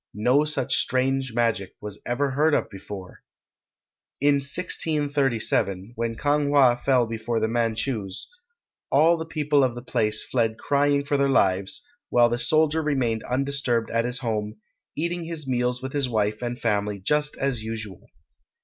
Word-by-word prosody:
No 125 Hz, +8 st, +3 dB
such 140 Hz, -3 st, +1 dB
strange 130 Hz, 0 st, 0 dB
magic 115 Hz, -6 st, 0 dB
was 105 Hz, -1 st, -8 dB
ever 135 Hz, +3 st, 0 dB
heard 150 Hz, +3 st, +3 dB
of -, -, -1 dB
before. 95 Hz, -1 st, -9 dB, 1.0 s
In 145 Hz, 0 st, +4 dB
1637, 140 Hz, -, -1 dB
when 115 Hz, 0 st, -2 dB
Kang 145 Hz, +2 st, +1 dB
wha 140 Hz, -4 st, +5 dB
fell 125 Hz, 0 st, +2 dB
before 115 Hz, +1 st, -2 dB
the 110 Hz, -, +1 dB
Manchus, 115 Hz, -3 st, -2 dB, 0.6 s
all 160 Hz, +5 st, +5 dB
the 160 Hz, -1 st, -5 dB
people 150 Hz, -3 st, +2 dB
of 125 Hz, -2 st, 0 dB
the 120 Hz, -, -7 dB
place 105 Hz, -4 st, +1 dB
fled 115 Hz, -3 st, 0 dB
crying 145 Hz, 0 st, +1 dB
for 145 Hz, 0 st, +1 dB
their 140 Hz, 0 st, +2 dB
lives, 95 Hz, -, +1 dB, 0.2 s
while 120 Hz, -1 st, +4 dB
the 120 Hz, +1 st, -1 dB
soldier 155 Hz, +5 st, +2 dB
remained 130 Hz, -7 st, 0 dB
undisturbed 130 Hz, -3 st, 0 dB
at 115 Hz, 0 st, +1 dB
his 125 Hz, 0 st, -3 dB
home, 110 Hz, -3 st, -3 dB, 0.4 s
eating 170 Hz, +2 st, -2 dB
his 160 Hz, -4 st, -6 dB
meals 125 Hz, 0 st, -1 dB
with 130 Hz, -, -5 dB
his 140 Hz, -3 st, 0 dB
wife 105 Hz, -2 st, 0 dB
and 120 Hz, 0 st, -4 dB
family 105 Hz, -2 st, 0 dB
just 150 Hz, +10 st, 0 dB
as 135 Hz, -4 st, -1 dB
usual. 110 Hz, -4 st, -7 dB
125 Hz, 155 wpm, -25 LUFS, 110-145 Hz, 1.0 s, wha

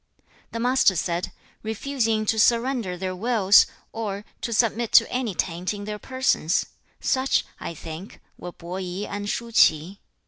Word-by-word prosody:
2. -, -, -39 dB, 0.3 s
The 230 Hz, -, -3 dB
Master 245 Hz, -5 st, +3 dB
said, 170 Hz, +1 st, -2 dB, 0.3 s
'Refusing 220 Hz, -1 st, -1 dB
to 220 Hz, +1 st, +1 dB
surrender 235 Hz, -5 st, +2 dB
their 185 Hz, 0 st, -3 dB
wills, 205 Hz, -1 st, +5 dB, 0.2 s
or 210 Hz, -2 st, -4 dB, 0.2 s
to 235 Hz, -, -3 dB
submit 230 Hz, 0 st, +1 dB
to -, -, +7 dB
any 245 Hz, -6 st, -2 dB
taint 180 Hz, +4 st, -2 dB
in 205 Hz, -, -7 dB
their 210 Hz, 0 st, -5 dB
persons; 260 Hz, -11 st, 0 dB, 0.3 s
such, 265 Hz, +1 st, +1 dB
I 170 Hz, -, -6 dB
think, 165 Hz, +5 st, -9 dB, 0.2 s
were 180 Hz, -, -8 dB
Po 175 Hz, +2 st, -7 dB
i 185 Hz, +2 st, -4 dB
and 205 Hz, 0 st, -4 dB
Shu 235 Hz, +2 st, -3 dB
ch'i. 180 Hz, -2 st, +3 dB
210 Hz, 160 wpm, -24 LUFS, 185-235 Hz, 0.3 s, to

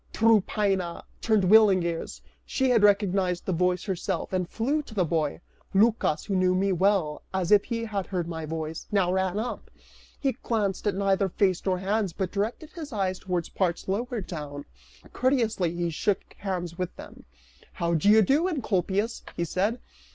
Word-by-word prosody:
Tryphaena 200 Hz, -5 st, +2 dB, 0.2 s
turned 220 Hz, -3 st, +2 dB
willing 195 Hz, -1 st, +6 dB
ears, 170 Hz, -1 st, -4 dB, 0.2 s
she 265 Hz, -1 st, 0 dB
had 230 Hz, -3 st, +4 dB
recognized 195 Hz, -3 st, +2 dB
that 190 Hz, -, 0 dB
voice 180 Hz, +1 st, +1 dB
herself, 190 Hz, -1 st, -3 dB
and 180 Hz, -2 st, -1 dB
flew 280 Hz, +7 st, 0 dB
to 245 Hz, -7 st, -13 dB
the 185 Hz, -3 st, +2 dB
boy. 160 Hz, -1 st, -1 dB, 0.3 s
Lycas, 210 Hz, -6 st, +2 dB
who 195 Hz, -, -2 dB
knew 185 Hz, 0 st, +3 dB
me 195 Hz, +2 st, +1 dB
as 180 Hz, -, -1 dB
well 190 Hz, -6 st, +2 dB
as 185 Hz, -1 st, -1 dB
if 205 Hz, -1 st, +6 dB
he 230 Hz, -1 st, -3 dB
had 200 Hz, -4 st, -3 dB
heard 180 Hz, -3 st, -2 dB
my 165 Hz, -1 st, -5 dB
voice, 160 Hz, 0 st, -5 dB
now 185 Hz, -3 st, +2 dB
ran 190 Hz, 0 st, 0 dB
up; 235 Hz, +3 st, -4 dB, 0.5 s
he 275 Hz, -2 st, +1 dB
glanced 215 Hz, -5 st, -2 dB
at 200 Hz, -, +1 dB
neither 195 Hz, 0 st, +1 dB
face 185 Hz, -1 st, +1 dB
nor 185 Hz, -1 st, +2 dB
hands, 195 Hz, 0 st, -1 dB
but 185 Hz, 0 st, -3 dB
directed 220 Hz, +10 st, -3 dB
his 315 Hz, -4 st, -8 dB
eyes 190 Hz, -4 st, -1 dB
towards 180 Hz, -3 st, -2 dB
parts 175 Hz, -3 st, -1 dB
lower 230 Hz, +4 st, -2 dB
down; 150 Hz, -5 st, -7 dB, 0.5 s
courteously 230 Hz, -9 st, +1 dB
he 170 Hz, -1 st, -1 dB
shook 190 Hz, +5 st, -1 dB
hands 180 Hz, -3 st, -4 dB
with 180 Hz, -1 st, -3 dB
them, -, -, -12 dB, 0.5 s
"How 170 Hz, -1 st, -1 dB
do 165 Hz, +5 st, +3 dB
you 215 Hz, +1 st, +7 dB
do, 295 Hz, -, +2 dB
Encolpius," 210 Hz, -, -1 dB, 0.2 s
he 170 Hz, -, 0 dB
said. 200 Hz, +8 st, 0 dB
190 Hz, 175 wpm, -27 LUFS, 180-215 Hz, 0.5 s, you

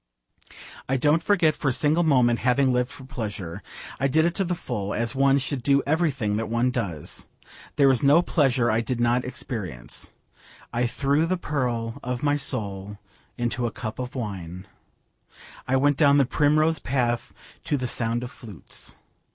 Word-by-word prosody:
I 135 Hz, -, +2 dB
don't 150 Hz, +6 st, +2 dB
regret 170 Hz, -6 st, +4 dB
for 145 Hz, -, -3 dB
a -, -, +2 dB
single 150 Hz, +6 st, +2 dB
moment 125 Hz, -7 st, +3 dB
having 130 Hz, +1 st, +2 dB
lived 125 Hz, 0 st, +1 dB
for 130 Hz, -, -11 dB
pleasure. 105 Hz, -, -5 dB, 0.4 s
I 140 Hz, -, +2 dB
did 160 Hz, +4 st, +3 dB
it 170 Hz, -, +1 dB
to 195 Hz, -, 0 dB
the 180 Hz, -1 st, -1 dB
full, 105 Hz, -, -4 dB
as 115 Hz, 0 st, -1 dB
one 135 Hz, 0 st, +4 dB
should 140 Hz, -1 st, -2 dB
do 140 Hz, +2 st, +3 dB
everything 140 Hz, -9 st, 0 dB
that 110 Hz, 0 st, -3 dB
one 120 Hz, +2 st, +1 dB
does. 100 Hz, -, -3 dB, 0.5 s
There 140 Hz, -, +5 dB
was 130 Hz, -3 st, +4 dB
no 145 Hz, +5 st, +5 dB
pleasure 130 Hz, -9 st, +2 dB
I 110 Hz, +1 st, +2 dB
did 120 Hz, +1 st, -3 dB
not 120 Hz, +1 st, +2 dB
experience. 105 Hz, -, -5 dB, 0.6 s
I 120 Hz, +1 st, +1 dB
threw 140 Hz, +6 st, +1 dB
the 185 Hz, +2 st, 0 dB
pearl 125 Hz, -8 st, -2 dB
of 125 Hz, +1 st, -4 dB
my 145 Hz, -1 st, +3 dB
soul 105 Hz, -7 st, -2 dB, 0.4 s
into 120 Hz, 0 st, -1 dB
a -, -, -4 dB
cup 110 Hz, -2 st, -6 dB
of 125 Hz, +1 st, -5 dB
wine. 95 Hz, -6 st, -5 dB, 1.0 s
I 130 Hz, -, +2 dB
went 140 Hz, +1 st, +3 dB
down 145 Hz, -2 st, +5 dB
the 140 Hz, -, +4 dB
primrose 155 Hz, +3 st, +2 dB
path 120 Hz, -3 st, -1 dB, 0.3 s
to 145 Hz, -, 0 dB
the 125 Hz, -1 st, -2 dB
sound 115 Hz, 0 st, -1 dB
of 125 Hz, -, -6 dB
flutes. 105 Hz, -7 st, -10 dB
125 Hz, 175 wpm, -25 LUFS, 115-145 Hz, 1.0 s, There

